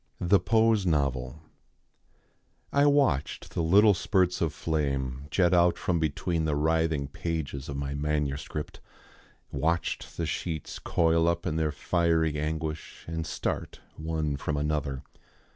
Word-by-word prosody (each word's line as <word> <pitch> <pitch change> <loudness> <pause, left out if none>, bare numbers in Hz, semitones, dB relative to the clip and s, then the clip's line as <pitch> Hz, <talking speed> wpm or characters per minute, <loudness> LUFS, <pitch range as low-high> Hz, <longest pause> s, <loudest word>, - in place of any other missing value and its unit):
THE 95 +3 +4
POSE 110 0 +3
NOVEL 70 -2 -1 1.3
I 140 +1 +5
watched 140 - +1
the - - -1
little 100 +6 +6
spurts 90 0 +1
of 80 -3 +1
flame 70 -4 -2
jet 90 +4 +3
out 85 0 +4
from 85 -2 0
between 80 +2 -1
the 75 -2 0
writhing 80 -1 +1
pages 70 -3 -4
of 70 - -4
my 70 0 -3
manuscript, 75 0 -2 0.7
watched 80 +5 -1
the - - -1
sheets 80 -4 -4
coil 80 0 +2
up 85 0 0
in 75 - -1
their 80 -1 +1
fiery 80 0 +1
anguish 80 0 -4
and 80 0 -4
start - - -3 0.2
one 80 -2 -2
from 75 +1 -2
another. 75 -2 -1
80 Hz, 130 wpm, -28 LUFS, 70-85 Hz, 1.3 s, little